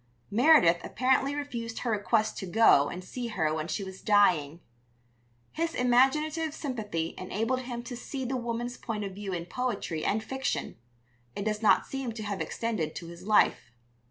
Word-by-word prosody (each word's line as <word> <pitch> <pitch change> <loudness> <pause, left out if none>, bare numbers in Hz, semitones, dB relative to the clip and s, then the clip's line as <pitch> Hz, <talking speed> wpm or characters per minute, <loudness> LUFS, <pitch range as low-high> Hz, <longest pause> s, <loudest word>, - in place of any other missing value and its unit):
Meredith 230 - +6
apparently 265 +3 +1
refused 235 -6 -5
her 240 - -2
request 215 +1 +1
to 190 - -5
go 180 -8 +5
and 180 +1 -6
see 240 +6 -5
her 160 -8 0
when 155 0 -3
she 195 - -2
was 190 0 -9
dying. 175 -8 +3 0.9
His 330 +1 -2
imaginative 295 +6 +2
sympathy 210 - -3
enabled 225 +7 -1
him 245 -2 -5
to 245 0 -6
see 265 +2 -5
the 260 +2 -2
woman's 240 0 -3
point 215 -3 -4
of 195 -1 -5
view 200 0 -6
in 170 -2 -3
poetry 180 -7 -3
and 215 +2 0
fiction; 265 +3 -3 0.6
it 200 - -4
does 215 0 -1
not 220 - +4
seem 270 -4 -4
to 220 -1 -6
have 205 -2 -3
extended 215 -10 -2
to 170 - -7
his 170 +3 -11
life. 210 - +3
225 Hz, 170 wpm, -29 LUFS, 190-255 Hz, 0.9 s, Meredith